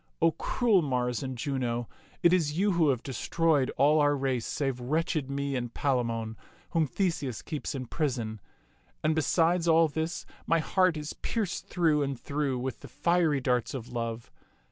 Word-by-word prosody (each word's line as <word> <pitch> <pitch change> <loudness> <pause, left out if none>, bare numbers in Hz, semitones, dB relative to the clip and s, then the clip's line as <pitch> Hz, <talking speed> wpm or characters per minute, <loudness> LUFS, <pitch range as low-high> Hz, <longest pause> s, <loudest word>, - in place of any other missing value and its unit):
O 165 0 +4
cruel 215 - +2
Mars 125 -4 -1
and 130 -2 -4
Juno, 120 -3 -2 0.4
it 170 - +6
is 160 -4 +1
you 200 +2 +3
who 170 -4 +3
have 125 -3 0
destroyed 145 +2 +1
all 150 +3 +5
our 145 -1 +4
race 130 -4 -1
save 135 -3 -2
wretched 150 +2 -1
me 140 0 -2
and 120 -2 -3
Palamon, 115 -5 -1 0.3
whom 160 -3 +2
Theseus 145 - -2
keeps 150 -2 -4
in 130 -1 -4
prison. 120 - -2 0.6
And 155 +1 +3
besides 165 +3 +2
all 165 0 +6
this, 160 +2 -3 0.2
my 165 - +4
heart 180 +1 +2
is 150 0 -5
pierced 215 -6 -3
through 160 -4 +2
and 140 -3 -2
through 140 -2 -1
with 130 +1 -4
the - - -10
fiery 170 -5 +1
darts 125 0 0
of 125 -2 -6
love. 115 -1 -4
145 Hz, 165 wpm, -29 LUFS, 125-165 Hz, 0.6 s, it